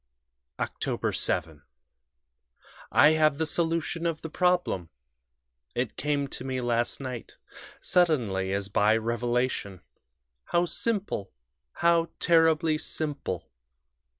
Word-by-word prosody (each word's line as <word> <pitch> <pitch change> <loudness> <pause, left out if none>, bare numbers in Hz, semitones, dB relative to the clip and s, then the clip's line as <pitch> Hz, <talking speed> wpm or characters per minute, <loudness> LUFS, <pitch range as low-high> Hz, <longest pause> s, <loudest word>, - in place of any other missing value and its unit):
"Oct. - - -2
7. 80 -2 -1 1.3
I 150 - +7
have 155 -2 +3
the 160 - 0
solution 165 +1 -1
of 160 -1 -3
the 160 - -6
problem; 180 - +1 0.9
it 120 -2 -2
came 145 -1 0
to - - -5
me 130 -1 -2
last 120 -1 0
night 130 -4 -6 0.5
suddenly, 115 - +2
as 100 0 -1
by 105 +2 +3
revelation. 120 -4 -1 0.6
How 175 0 +2
simple 195 - -2 0.4
how 170 -1 +3
terribly 160 -2 +3
simple! 140 - -3
140 Hz, 100 wpm, -27 LUFS, 115-165 Hz, 1.3 s, I